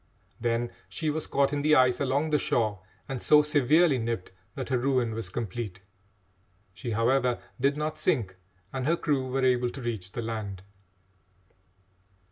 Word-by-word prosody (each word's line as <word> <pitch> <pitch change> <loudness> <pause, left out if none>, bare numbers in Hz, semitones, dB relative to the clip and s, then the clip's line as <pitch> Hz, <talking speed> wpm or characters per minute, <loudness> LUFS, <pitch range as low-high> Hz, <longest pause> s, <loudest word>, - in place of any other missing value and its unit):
Then 120 0 0 0.2
she 155 -2 -1
was 155 +1 -3
caught 140 0 +2
in 145 - 0
the 155 +1 +4
ice 125 -2 +4
along 140 +3 0
the 150 - +3
shore 110 -7 0 0.3
and 135 -2 -4
so 150 0 +6
severely 150 0 +4
nipped 115 -4 -3 0.2
that 130 -2 -5
her 130 - +2
ruin 125 -3 +1
was 110 -4 -4
complete. 105 -2 -4 0.9
She, 125 - -6
however, 120 +2 +2 0.2
did 140 +3 +2
not 155 +1 -3
sink, 110 -11 0 0.4
and 130 0 -2
her 170 +2 +3
crew 140 -6 0
were 130 +1 +1
able 125 -1 +3
to 135 - -9
reach 105 -6 -4
the 120 - -3
land. 105 -4 -5
125 Hz, 160 wpm, -28 LUFS, 115-145 Hz, 0.9 s, so